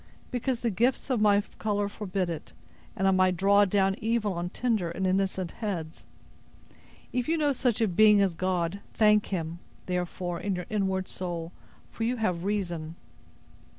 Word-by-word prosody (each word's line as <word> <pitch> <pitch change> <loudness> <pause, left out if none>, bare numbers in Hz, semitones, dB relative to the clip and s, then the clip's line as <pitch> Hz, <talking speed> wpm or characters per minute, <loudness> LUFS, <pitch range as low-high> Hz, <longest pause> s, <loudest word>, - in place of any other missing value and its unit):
—because 245 0 -1
the 235 - 0
gifts 245 +7 +1
of 240 -4 +1
my 205 -1 +5 0.2
color 205 -1 0
forbid 195 -3 -3
it, 165 -2 -6 0.4
and 195 - +1
I - - +5
might 185 -1 +3
draw 200 +2 +5
down 195 0 +2
evil 225 -2 0
on 175 0 -3
tender 220 -6 0
and 190 +3 -3
innocent 190 -1 0
heads. 170 -7 -4 1.1
If 250 +3 -1
you 330 - +2
know 295 -2 +2
such 245 -3 0
a 225 - +4
being 210 +3 +6
as 195 -3 +2
God, 180 +1 -1 0.2
thank 210 -1 +4
Him, 170 -3 -3 0.3
therefore, 180 -1 -3
in 200 -1 -1
your 180 -1 -4
inward 190 -3 0
soul; 170 -2 -5 0.4
for 225 - -4
you 240 +2 +1
have 185 -6 -1
reason!" 175 -6 -2
195 Hz, 165 wpm, -28 LUFS, 180-215 Hz, 1.1 s, being